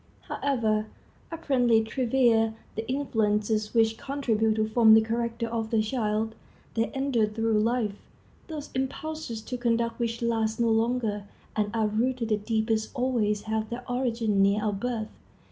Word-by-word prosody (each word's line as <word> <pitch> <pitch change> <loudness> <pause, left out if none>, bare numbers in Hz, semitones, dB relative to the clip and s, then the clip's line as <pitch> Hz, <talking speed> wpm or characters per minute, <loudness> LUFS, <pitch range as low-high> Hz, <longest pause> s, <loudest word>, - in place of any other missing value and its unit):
However 220 -6 0 0.4
apparently 250 -8 +2
trivial 230 -2 +2 0.2
the 220 +2 -5
influences 215 -5 0
which 225 0 +3
contribute 225 -6 0
to 215 0 +1
form 220 0 +6
the 220 - +7
character 230 +1 -2
of 225 -1 -3
the 225 -1 +2
child, 215 -1 -1 0.4
they 225 0 0
endure 270 -5 +1
through 225 0 0
life. 225 -1 +1 0.5
Those 305 -3 -7
impulses 265 -2 -4
to 250 - -4
conduct 235 -1 0
which 235 0 -2
last 225 -2 0
the 235 - +2
longest 225 -2 0 0.3
and 210 -1 +1
are 220 -1 +2
rooted 230 +2 0
the 215 - +2
deepest 220 +1 0
always 230 -5 0
have 220 0 -2
their 245 +1 -6
origin 235 -5 0
near 200 +2 +3
our 210 - +1
birth. 220 +1 -3
225 Hz, 145 wpm, -27 LUFS, 215-245 Hz, 0.5 s, the